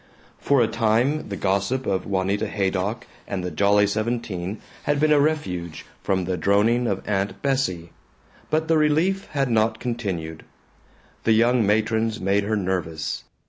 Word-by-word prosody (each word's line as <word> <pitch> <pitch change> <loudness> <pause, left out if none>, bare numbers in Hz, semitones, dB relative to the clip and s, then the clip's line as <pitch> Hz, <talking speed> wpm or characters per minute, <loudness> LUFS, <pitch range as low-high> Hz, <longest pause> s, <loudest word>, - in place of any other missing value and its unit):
For 140 -3 +3
a - - +2
time 115 +6 +1
the 100 - -3
gossip 100 +8 0
of 95 -1 -1
Juanita 100 +1 0
Haydock 100 +2 -2 0.2
and 95 -2 -3
the 90 - -3
Jolly 100 +5 +3
Seventeen 105 -3 -2 0.3
had 145 0 +1
been 155 +1 +3
a 150 - +5
refuge 95 - -2 0.2
from 95 -2 0
the 90 0 -2
droning 105 +7 +2
of 95 -3 -3
Aunt 100 -1 -1
Bessie, 95 -12 -1 0.6
but 155 +1 0
the 160 -1 +3
relief 165 +6 +1
had 135 -3 0
not 110 0 +2
continued. 95 -10 -4 0.8
The 115 - +4
young 120 +2 +3
matrons 110 +1 +1
made 100 +1 +1
her 110 +1 0
nervous. 90 -5 -3
105 Hz, 150 wpm, -23 LUFS, 95-125 Hz, 0.8 s, a